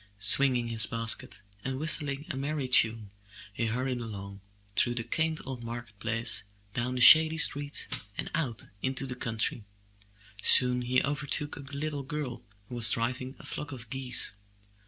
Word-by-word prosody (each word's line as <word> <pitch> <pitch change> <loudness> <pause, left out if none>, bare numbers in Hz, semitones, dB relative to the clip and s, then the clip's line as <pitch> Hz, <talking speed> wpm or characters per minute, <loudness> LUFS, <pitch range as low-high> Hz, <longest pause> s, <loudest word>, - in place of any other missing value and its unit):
Swinging 120 +4 +2
his 110 -2 +3
basket 115 -4 +2 0.3
and 130 0 -4
whistling 150 -2 -2
a - - -6
merry 140 0 -4
tune, 110 -4 +3 0.4
he 115 +2 -2
hurried 125 +2 -3
along, 100 -3 -9 0.3
through 120 - +1
the 115 - -3
quaint 160 +4 -2
old 130 -3 -7
market 115 -3 -9
place, 115 -1 +1 0.3
down 125 +3 -3
the 125 - -2
shady 160 +4 +8
streets, 145 -1 +1 0.3
and - - -5
out 135 -9 -4 0.2
into 130 +1 -2
the 130 - -6
country. 115 -2 -4 0.8
Soon 125 +2 +6
he 125 +1 0
overtook 145 +1 -3
a - - -11
little 140 +1 -6
girl 140 -2 -6 0.3
who - - -11
was 120 -2 +6
driving 130 +3 -2
a - - -15
flock 150 -1 -6
of 120 -4 -10
geese. 130 -5 0
125 Hz, 155 wpm, -28 LUFS, 115-140 Hz, 0.8 s, shady